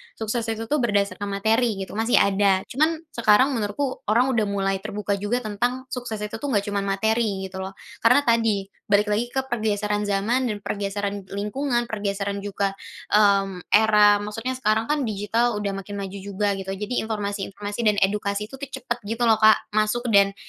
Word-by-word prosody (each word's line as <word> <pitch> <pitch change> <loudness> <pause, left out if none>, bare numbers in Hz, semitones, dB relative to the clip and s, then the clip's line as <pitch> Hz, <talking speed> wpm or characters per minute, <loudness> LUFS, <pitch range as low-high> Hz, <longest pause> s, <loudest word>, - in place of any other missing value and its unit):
sukses 225 +1 -2
itu 225 0 -2
tuh 300 - +3
berdasarkan 205 -3 0
materi 220 +3 +1
gitu, - - -10
masih 225 +2 +2
ada. 195 -1 +3
Cuman, 310 +5 +2 0.2
sekarang 235 +3 +4
menurutku 250 +3 -2
orang 245 +5 +3
udah 220 -4 +1
mulai 195 -1 -1
terbuka 205 0 -3
juga 240 +5 -1
tentang 245 +5 -2
sukses 245 -3 -4
itu 210 +2 -5
tuh 285 - -4
nggak 210 -7 +1
cuma 200 - 0
materi 200 0 0
gitu 190 - -7
loh. 190 +1 -6 0.2
Karena 285 +5 +5
tadi, 225 -5 +2 0.3
balik 205 +1 +4
lagi 220 +4 0
ke 265 0 -2
pergeseran 210 -3 -1
zaman 215 +5 0
dan 210 - -4
pergeseran 200 0 -3
lingkungan, 240 +4 -1
pergeseran 200 -1 -3
juga, 200 -1 -2 0.4
mmm, 195 -3 +3
era, 210 -1 +6
maksudnya 225 +4 -4
sekarang 220 -3 +1
kan 300 -2 +1
digital 215 +3 0
sudah 205 -1 -2
makin 195 +1 -7
maju 200 0 -5
juga 200 +1 -1
gitu, 195 0 -4
jadi 210 +5 -2
informasi-informasi 205 -1 -4
dan 210 - +4
edukasi 205 +1 -1
itu 270 - -10
tuh 280 - -5
cepet 240 -2 -4
gitu 225 +3 -2
loh 225 -2 +4
Kak, 220 0 +4
masuk 215 +3 +1
dan 200 -1 +4
210 Hz, 175 wpm, -24 LUFS, 200-230 Hz, 0.4 s, era